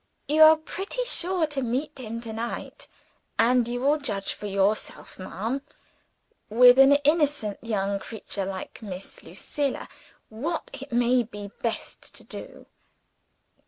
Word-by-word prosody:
You 305 +2 +3
are 315 0 +10
pretty 385 +9 -4
sure 365 -7 +1
to 295 -3 -3
meet 265 +4 -2
him 230 -1 -5
to 225 -2 -6
night; 230 +2 -5 0.5
and 240 +1 +4
you 245 +1 -3
will 290 +3 +3
judge 205 -8 -1
for 210 - -7
yourself, 200 +1 -1
ma'am 215 +8 -3 0.9
with 245 +3 +7
an 270 +1 +8
innocent 290 -8 +2
young 200 -3 -1
creature 200 -2 -5
like 190 +3 -6
Miss 195 -3 -7
Lucilla 285 -2 -3 0.4
what 290 +10 -4
it 275 0 -8
may 245 +1 +3
be 205 -3 -8
best 230 -2 -4
to - - -9
do?" - - -10
240 Hz, 135 wpm, -26 LUFS, 215-290 Hz, 0.9 s, are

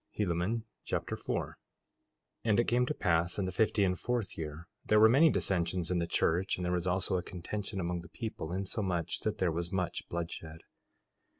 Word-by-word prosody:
Helaman 100 +3 0 0.2
Chapter - - -2
4 - - -2
4:1 - - -14 0.9
And 110 -1 +3
it - - +5
came 125 +1 +3
to 150 - 0
pass 85 -2 +1
in 100 - 0
the 95 - -2
fifty 105 +2 +2
and 90 -2 +1
fourth 120 -5 -1
year 80 +1 -6 0.2
there 105 - +4
were 110 - +9
many 140 +8 +6
dissensions 90 - 0
in 90 - +2
the 85 - 0
church, 90 +2 +1
and 90 - -3
there 90 - 0
was 90 0 0
also 95 +1 +1
a - - -1
contention 95 +3 -5
among 85 -1 -1
the 90 - -13
people, 110 -8 -5
insomuch 90 -3 -1
that 110 - -2
there 90 -2 +2
was 85 +2 -3
much 90 -3 -2
bloodshed. 85 -2 -5
90 Hz, 195 wpm, -32 LUFS, 85-105 Hz, 0.9 s, were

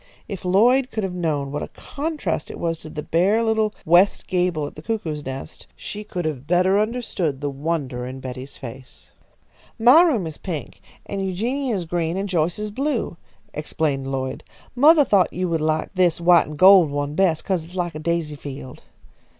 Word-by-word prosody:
If 195 -2 -6
Lloyd 240 +8 +4
could 220 - -3
have 190 -2 -2
known 150 -6 -2
what 145 - -3
a - - -4
contrast 285 - -4
it - - -7
was 165 -1 -2
to 155 - -10
the 150 -1 -6
bare 195 +7 +2
little 220 -1 +1
west 175 +5 +4
gable 175 -4 0
at - - -7
the 155 - -10
cuckoo's 160 -8 -3
nest, 135 0 -7
she 210 0 -7
could 180 -5 -5
have 145 -3 -4
better 185 +3 +3
understood 210 - -2
the 145 0 -2
wonder 140 -4 -3
in 130 +1 -7
Betty's 130 +1 -8
face. 130 +1 -11 0.7
"My 250 +8 +7
room 275 - +2
is 160 -2 -7
pink, 165 -6 -6 0.2
and 195 -1 -3
Eugenia's 220 +2 -1
green, 165 +1 -1
and 195 +1 -2
Joyce's 180 +4 -1
blue," 265 - -2 0.4
explained 145 -3 -2
Lloyd. 130 -1 -3 0.3
"Mothah 295 +3 +6
thought 195 -7 +3
you 185 +1 -2
would 165 -2 0
like 155 0 0
this 180 -3 +2
white 170 0 +5
and 150 0 -8
gold 185 -2 +7
one 145 0 -2
best, 165 -2 +1
'cause 185 -4 0
it's 170 +3 -13
like 175 -2 -2
a 155 - -6
daisy 165 -1 -1
field." 135 -3 -9
175 Hz, 185 wpm, -22 LUFS, 150-200 Hz, 0.7 s, My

